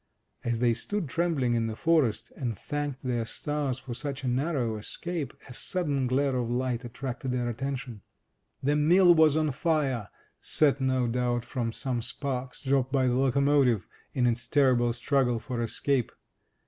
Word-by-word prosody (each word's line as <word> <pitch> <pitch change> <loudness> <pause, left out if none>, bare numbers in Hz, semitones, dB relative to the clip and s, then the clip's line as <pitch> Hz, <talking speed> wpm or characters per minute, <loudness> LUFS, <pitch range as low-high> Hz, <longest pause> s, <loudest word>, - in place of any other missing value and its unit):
As 120 -1 0
they 120 0 +3
stood 185 - -3
trembling 150 -5 0
in 115 -1 +1
the 110 - -4
forest, 155 -7 +1
and 120 -6 -3
thanked 145 -3 -4
their 120 -3 0
stars 140 +2 -2
for 130 -2 -7
such 140 +2 -5
a - - -1
narrow 125 -3 0
escape, 165 +8 -4 0.2
a 125 - -9
sudden 145 -3 -1
glare 135 +1 +1
of 120 -2 -1
light 125 0 -1
attracted 125 +1 -5
their 125 -1 -1
attention. 125 -2 -4 0.6
The 145 +2 +2
mill 175 +4 +6
was 160 -2 +5
on 155 -1 +1
fire, 135 -7 0 0.3
set, 145 -2 +2
no 130 -2 +1
doubt, 120 0 0
from 120 -4 -2
some 125 0 -1
sparks 125 +1 -4
dropped 135 -1 +1
by 135 -2 +2
the 125 - +2
locomotivean 135 -3 +3 0.3
its 120 -2 +1
terrible 125 -3 +3
struggle 125 -1 +1
for 120 +1 -4
escape. 125 +2 0
130 Hz, 160 wpm, -28 LUFS, 120-145 Hz, 0.6 s, mill